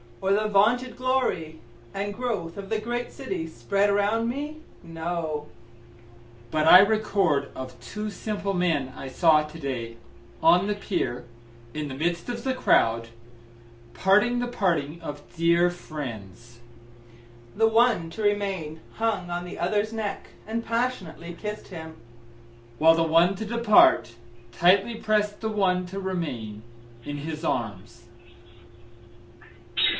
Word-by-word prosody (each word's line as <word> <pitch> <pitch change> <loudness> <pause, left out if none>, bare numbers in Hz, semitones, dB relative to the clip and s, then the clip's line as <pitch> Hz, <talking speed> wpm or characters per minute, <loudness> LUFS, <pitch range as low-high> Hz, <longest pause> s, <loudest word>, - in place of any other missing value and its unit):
Or 195 +1 +1
the 215 +1 +2
vaunted 230 +5 +2
glory 255 -12 -1 0.4
and 205 +1 -2
growth 200 -8 -3
of 200 -1 -7
the 220 -1 0
great 240 +2 -3
city 255 -11 -5
spread 195 +9 0
around 205 +3 +1
me?—No; 170 - -5 1.0
But 155 +3 +1
I 180 - +11
record 200 -8 +2
of 130 -2 -8
two 210 - -5
simple 200 0 -3
men 160 -8 0
I 135 - -7
saw 155 +2 +4
to 160 +2 -11
day, 120 -5 -4 0.4
on 175 +3 +5
the 210 - 0
pier, 175 -13 -3 0.5
in 150 -1 -3
the 130 - -6
midst 170 - -2
of 235 -1 -4
the 265 - 0
crowd, 115 - +2 0.8
parting 210 +6 +3
the 245 - -1
parting 170 -8 -1
of 145 0 -6
dear 170 +1 +4
friends; 120 - -8 1.0
The 225 +2 +4
one 225 -6 +3
to 220 - -6
remain 195 -7 -1
hung 215 -6 -1
on 175 0 -3
the 180 - -8
other's 210 +4 0
neck, 215 -3 -4 0.2
and 230 +1 -3
passionately 200 -8 -3
kiss'd 210 0 -6
him, 160 -3 -9 0.8
While 165 +3 +6
the 165 - +2
one 165 +4 +4
to 220 +3 -5
depart, 215 - +4 0.4
tightly 190 - +3
prest 210 -2 0
the 220 - -1
one 185 -4 +1
to 195 +2 -6
remain 145 - -4 0.4
in 145 +2 -5
his 155 +2 -6
arms. 115 - -3
180 Hz, 130 wpm, -26 LUFS, 155-215 Hz, 1.0 s, I